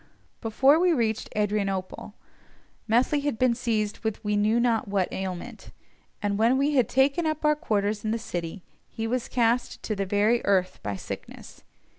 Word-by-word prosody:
Before 265 +7 +4
we 360 0 +4
reached 225 -6 -1
Adrianople, 200 -1 -2 0.7
Methley 245 +6 +2
had 285 -5 -2
been 255 0 +3
seized 220 -4 -1
with 220 0 -4
we 210 0 0
knew 215 +3 +2
not 235 -3 +1
what 195 -2 -1
ailment, 190 +5 -6 0.5
and 205 0 0
when 235 +4 +4
we 285 +2 +1
had 255 -6 +3
taken 280 +6 +2
up 310 0 -2
our 300 0 +4
quarters 210 -8 -1
in 215 - -1
the 225 - 0
city 175 -4 -5 0.3
he 225 - -4
was 245 +1 -1
cast 240 0 0
to 215 - -2
the 195 -1 -2
very 210 +4 +2
earth 185 -2 +1
by 100 -1 -3
sickness. - - -9
220 Hz, 170 wpm, -26 LUFS, 205-255 Hz, 0.7 s, Before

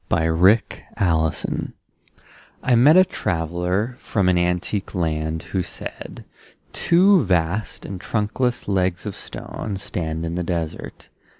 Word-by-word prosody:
Y 80 - +2
Z 80 - +2 0.7
Ozymandias 80 -4 0 0.9
I 125 - +2
MET 140 +8 +7
a 185 - +7
traveller 90 - -2
from 100 -4 0
an 90 - +3
antique 90 +4 -1
land 80 -2 -1
Who 95 - +1
said: - - -8 0.5
Two 185 +2 +4
vast 90 +1 -1
and 95 -2 -6
trunkless 120 +3 -1
legs 95 -2 0
of 105 - -4
stone 100 -3 -6
Stand 80 -4 -4
in 85 - -3
the 90 - -2
desert 85 -2 -5
90 Hz, 125 wpm, -22 LUFS, 85-105 Hz, 0.9 s, MET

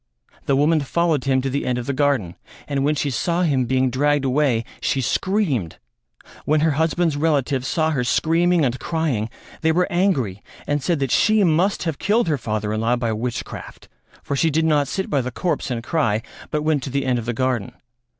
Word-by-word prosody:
The 140 - +3
woman 155 +3 +3
followed 155 0 0
him 130 -1 +2
to 135 - -1
the 140 - -1
end 125 -1 -1
of 125 - -4
the 140 - -2
garden 135 - +1 0.3
and 140 -1 -1
when 150 +2 +2
she 145 -1 -1
saw 170 +8 0
him 135 -6 +2
being 130 +1 +1
dragged 145 +2 +1
away, 130 -4 +1 0.2
she 135 - 0
screamed. 140 - 0 0.7
When 155 0 +2
her 160 0 +3
husband's 160 +1 +1
relatives 145 -4 0
saw 160 +2 +1
her 135 -5 0
screaming 165 +5 +2
and 125 0 -1
crying 150 -10 -1 0.3
they 160 - +3
were 180 +3 +2
angry 140 - 0 0.2
and 145 0 0
said 170 +5 0
that 135 -3 0
she 215 -1 +4
must 180 +4 +2
have 160 -5 -3
killed 215 +1 +2
her 145 -3 0
father 110 -2 -2
in 110 - -1
law 115 +2 +2
by 120 -2 -1
witchcraft, 115 +2 -6 0.3
for 140 - -2
she 160 +4 +2
did 160 +2 +1
not 150 -3 +2
sit 190 +6 -3
by 140 -3 +1
the 125 - -3
corpse 170 +4 -2
and 120 -2 -3
cry 115 -7 0 0.3
but 150 0 -1
went 155 -2 +1
to 135 - -5
the 140 0 -1
end 125 -2 +1
of 115 - -6
the - - +1
garden. 125 -4 -1
140 Hz, 210 wpm, -21 LUFS, 125-160 Hz, 0.7 s, she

